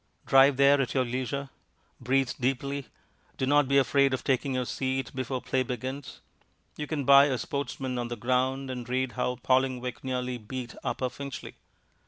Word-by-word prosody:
Drive 135 0 +6
there 140 0 +5
at 130 0 -3
your 130 -1 +2
leisure; 130 +3 -3 0.5
breathe 130 +1 +1
deeply. 135 +1 -1 0.5
Do 130 - 0
not 145 +1 +4
be 140 +1 +3
afraid 140 0 +3
of - - -8
taking 135 0 0
your 125 -1 0
seat 130 0 -2
before 130 -1 -3
play 130 - 0
begins 130 +2 -5 0.5
you 150 - -5
can 145 -3 -2
buy 140 +1 +8
a 135 -3 0
Sportsman 130 0 -3
on 120 - -2
the 120 - -4
ground 130 +3 0
and 125 -1 -6
read 130 0 0
how 125 +3 -1
Vallingwick 125 0 0
nearly 125 -1 -2
beat 120 +2 -6
Upper 130 - -1
Finchley. 135 +2 -7
130 Hz, 170 wpm, -28 LUFS, 125-140 Hz, 0.5 s, buy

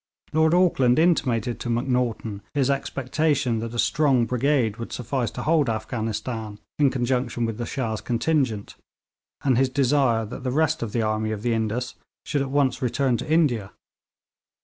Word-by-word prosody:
Lord 160 +2 +4
Auckland 135 -9 +3
intimated 125 -9 +1
to 120 - -4
Macnaghten 120 -4 -1
his 140 -1 +2
expectation 135 -2 0
that 115 +1 -5
a - - -4
strong 135 -2 +3
brigade 125 -3 +1
would 115 - -7
suffice 125 0 -2
to - - -6
hold 155 -5 +2
Afghanistan 110 -1 -3 0.2
in 145 -2 +5
conjunction 125 -2 -1
with 115 0 -4
the 120 - -3
Shah's 110 -7 -3
contingent, 120 -2 0 0.7
and 130 -3 +3
his 135 -1 +3
desire 130 -4 +2
that 105 - -8
the 130 - -1
rest 155 +3 +1
of 115 -3 -3
the 115 0 0
army 110 0 -1
of 105 -1 -4
the 120 -1 +1
Indus 115 +3 -2 0.3
should 145 -2 0
at 135 - -2
once 135 -2 +1
return 130 0 +1
to 155 - -5
India. 125 -12 +2
125 Hz, 165 wpm, -24 LUFS, 115-140 Hz, 0.7 s, in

